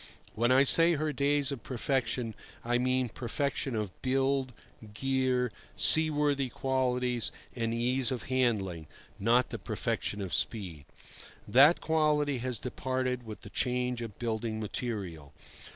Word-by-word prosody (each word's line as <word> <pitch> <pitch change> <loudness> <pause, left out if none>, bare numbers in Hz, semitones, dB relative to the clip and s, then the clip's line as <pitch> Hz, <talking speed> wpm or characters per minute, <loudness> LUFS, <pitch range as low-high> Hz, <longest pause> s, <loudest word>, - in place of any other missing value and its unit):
When 120 +3 +1
I 130 +1 +6
say 165 +4 +5
her 155 -1 -1
days 140 0 +2
of 135 -4 -5
perfection, 125 -2 -1 0.3
I 120 +1 +1
mean 130 0 +1
perfection 130 +2 -2
of 105 -3 -2
build, 135 0 +1 0.4
gear, 130 -1 0 0.2
seaworthy 150 -4 +3
qualities 125 -2 0 0.2
and 115 -2 -1
ease 125 +2 +2
of 130 -3 -3
handling, 105 -11 0 0.3
not 120 +5 +3
the - - -4
perfection 105 - -2
of 95 -3 -4
speed. 90 -10 -2 0.6
That 145 +7 +6
quality 150 -4 +1
has 125 -1 -3
departed 125 -1 -3
with 110 - -8
the - - -11
change 125 -1 -1
of 115 -4 -7
building 110 -1 -2
material. 100 - -5
125 Hz, 130 wpm, -30 LUFS, 115-135 Hz, 0.6 s, I